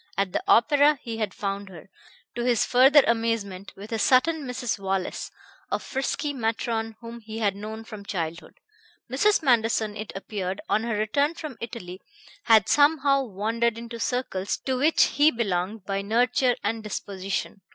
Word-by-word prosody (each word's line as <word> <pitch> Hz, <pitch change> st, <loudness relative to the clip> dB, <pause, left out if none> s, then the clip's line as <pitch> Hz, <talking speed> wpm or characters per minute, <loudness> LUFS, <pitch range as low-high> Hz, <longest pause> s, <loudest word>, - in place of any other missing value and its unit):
At 195 Hz, -1 st, 0 dB
the -, -, 0 dB
opera 295 Hz, -6 st, +5 dB
he 230 Hz, -2 st, -5 dB
had 215 Hz, -3 st, -2 dB
found 200 Hz, 0 st, -4 dB
her, 175 Hz, -2 st, -12 dB, 0.5 s
to 240 Hz, -, -3 dB
his 240 Hz, -2 st, +2 dB
further 270 Hz, +3 st, +6 dB
amazement, 225 Hz, -4 st, -1 dB
with 205 Hz, +3 st, -10 dB
a 225 Hz, -, -1 dB
certain 280 Hz, +5 st, +3 dB
Mrs. 245 Hz, -3 st, -3 dB
Wallace, 195 Hz, -1 st, -2 dB, 0.4 s
a -, -, +1 dB
frisky 280 Hz, +2 st, -3 dB
matron 225 Hz, -2 st, -2 dB
whom 235 Hz, 0 st, -8 dB
he 220 Hz, 0 st, -8 dB
had 205 Hz, -4 st, 0 dB
known 215 Hz, +2 st, -7 dB
from 215 Hz, -2 st, -9 dB
childhood. 170 Hz, -2 st, -5 dB, 0.5 s
Mrs. 405 Hz, +8 st, +3 dB
Manderson, 225 Hz, -4 st, +2 dB
it 215 Hz, 0 st, -6 dB
appeared, 195 Hz, -1 st, -4 dB
on 215 Hz, -, +2 dB
her 230 Hz, -3 st, -1 dB
return 280 Hz, +9 st, +1 dB
from 310 Hz, -6 st, -7 dB
Italy, 190 Hz, -6 st, -7 dB, 0.4 s
had 225 Hz, -3 st, +5 dB
somehow 285 Hz, -2 st, +4 dB
wandered 225 Hz, +2 st, -1 dB
into 235 Hz, 0 st, -7 dB
circles 225 Hz, -6 st, -2 dB
to 260 Hz, -, 0 dB
which 300 Hz, +5 st, +4 dB
he 295 Hz, +2 st, +4 dB
belonged 200 Hz, -, -2 dB
by 195 Hz, 0 st, -2 dB
nurture 245 Hz, +4 st, +2 dB
and 220 Hz, +2 st, -1 dB
disposition. 195 Hz, -2 st, -4 dB
225 Hz, 160 wpm, -25 LUFS, 200-255 Hz, 0.5 s, further